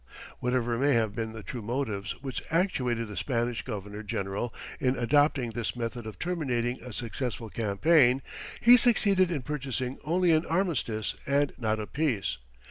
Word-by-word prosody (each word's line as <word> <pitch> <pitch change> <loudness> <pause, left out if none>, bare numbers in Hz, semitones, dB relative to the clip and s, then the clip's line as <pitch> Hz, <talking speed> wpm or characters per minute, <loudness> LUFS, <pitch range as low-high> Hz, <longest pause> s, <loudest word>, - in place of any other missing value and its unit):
Whatever 120 -1 0
may 140 +1 +4
have 110 -3 +2
been 110 +1 -3
the 110 -1 -8
true 125 - -6
motives 110 -3 -2
which 135 -2 -3
actuated 125 - +1
the 105 - -8
Spanish 120 -2 -1
governor 105 -3 -6
general 100 +2 -3 0.3
in 130 -1 +2
adopting 135 -1 +3
this 115 +1 -3
method 120 -1 -4
of 105 -4 -8
terminating 130 -9 -1
a 125 - -8
successful 115 -1 -4
campaign, 125 +5 +3 0.4
he 245 +2 +9
succeeded 200 -6 +4
in 150 -7 -2
purchasing 135 -2 -3
only 175 +3 +3
an 160 0 +4
armistice 155 - 0
and 140 0 +2
not 110 -2 0
a 105 - -3
peace. 110 - -1
125 Hz, 155 wpm, -29 LUFS, 110-145 Hz, 0.4 s, he